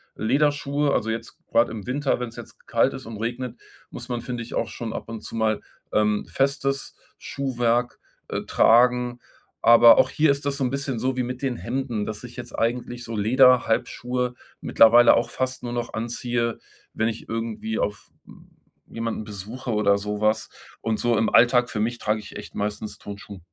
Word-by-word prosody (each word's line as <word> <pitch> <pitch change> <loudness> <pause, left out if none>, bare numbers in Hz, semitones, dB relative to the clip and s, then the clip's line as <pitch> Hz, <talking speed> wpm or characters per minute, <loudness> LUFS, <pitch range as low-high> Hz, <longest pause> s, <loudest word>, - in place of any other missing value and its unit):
Lederschuhe 145 +3 +1
also 110 - 0
jetzt 110 +1 -5
grad 115 +1 +3
im 110 -1 -7
Winter, 135 +1 0
wenn's 120 -2 -5
jetzt - - -11
k - - -28
kalt - - +2
ist - - -8
und 110 -1 -7
regnet, 120 +2 -4 0.3
muss - - -9
man, 120 -1 -2
finde 120 0 -5
ich, 115 - -10
auch - - -1
schon 115 -2 -5
ab - - -6
und 115 -2 -6
zu - - -8
mal, 110 -1 +1 0.3
ähm, 105 0 +2
festes 135 0 -1 0.2
Schuhwerk, 120 -3 -1 0.3
äh, - - -3
tragen, 125 +1 +4 0.4
aber 115 0 +8
auch - - +4
hier 155 -1 +3
ist 140 0 -3
das 140 -1 -1
so 140 - -1
'n 125 - +1
bisschen 135 -2 -3
so 130 +2 -1
wie 125 - +1
mit 125 +1 -5
den 135 -3 -1
Hemden, 120 -3 -3
dass 110 +1 -6
ich 120 -1 -10
jetzt 120 -1 -8
eigentlich 120 +1 -2
so 115 -1 -6
Lederhalbschuhe 125 +1 +2 0.3
mittlerweile 120 +2 +6
auch 115 - 0
fast 130 0 -3
nur 120 -1 -4
noch 120 -1 -3
anziehe, 120 +1 -2 0.3
wenn 110 - 0
ich 115 - -7
irgendwie 110 -1 -3
auf, 105 +1 -3 0.2
hm - - -17 0.4
jemanden 115 -1 -3
besuche 105 +5 -8
oder 100 -2 +3
so 105 +1 -4
was 110 +1 +1 0.3
und 110 -1 -1
so 120 -1 +2
im 110 0 +2
Alltag 125 0 +5
für 105 - -4
mich 120 +3 -1
trage 105 0 0
ich - - -12
echt - - -10
meistens 105 +1 -4
Turnschuhe. 100 -1 -9
120 Hz, 190 wpm, -24 LUFS, 110-125 Hz, 0.4 s, aber